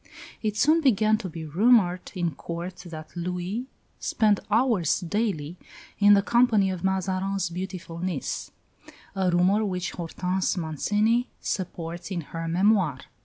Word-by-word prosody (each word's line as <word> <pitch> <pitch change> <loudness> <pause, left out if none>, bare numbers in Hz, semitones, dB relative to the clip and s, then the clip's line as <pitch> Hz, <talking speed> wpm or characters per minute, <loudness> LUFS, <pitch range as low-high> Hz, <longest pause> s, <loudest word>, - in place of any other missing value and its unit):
It 215 -1 -2
soon 310 +7 +4
began 215 -5 +3
to 195 -5 -5
be 160 -1 -7
rumoured 185 +2 +3
in 175 -2 0
Court 170 +5 -6
that 155 -1 -9
Louis 180 +7 -3 0.3
spent 210 -3 +2
hours 220 - +2
daily 180 -4 -2 0.4
in 205 0 +7
the 200 - +3
company 225 -5 +3
of 185 -2 -5
Mazarin's 190 0 -1
beautiful 180 -1 -6
niece; 175 -5 -3 0.7
a 190 -1 +1
rumour 185 +5 +3
which 185 -3 -2
Hortense 180 +2 -2
Mancini 210 - +1
supports 175 -2 -4
in 180 -4 -2
her 165 +2 -6
"Memoirs." 180 -5 +2
185 Hz, 130 wpm, -26 LUFS, 170-210 Hz, 0.7 s, in